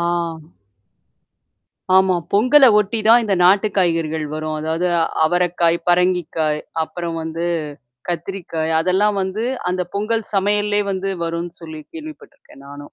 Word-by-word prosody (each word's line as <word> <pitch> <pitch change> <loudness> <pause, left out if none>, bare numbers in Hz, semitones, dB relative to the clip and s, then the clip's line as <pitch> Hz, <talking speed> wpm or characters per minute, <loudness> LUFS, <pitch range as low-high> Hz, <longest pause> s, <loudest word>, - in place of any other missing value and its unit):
ஆ. - - -1 2.0
ஆமா. 190 -1 +3 0.2
பொங்கல 255 +7 +5
ஒட்டி 210 +2 -1
தான் 235 +2 +7
இந்த 200 -3 0
நாட்டு 195 +4 +5
காய்கறிகள் 165 -4 0
வரும். 155 0 -4
அதாவது 160 +3 -1 0.4
அவரக்காய், 175 0 +1
பரங்கிக்காய் 175 -4 +1 0.2
அப்புறம் 165 +1 -5
வந்து 165 +1 -4 0.6
கத்திரிக்காய் 170 -2 -3
அதெல்லாம் 190 +4 +1
வந்து, 190 +4 -3 0.3
அந்த 180 0 -1
பொங்கல் 220 +2 -1
சமையல்லே 205 +1 +1
வந்து 195 0 -2
வரும்னு 170 +1 -4
சொல்லி 160 -2 -8
கேள்விப்பட்டுருக்கேன் 310 - -12
நானும். 145 0 -11
180 Hz, 115 wpm, -19 LUFS, 165-205 Hz, 2.0 s, தான்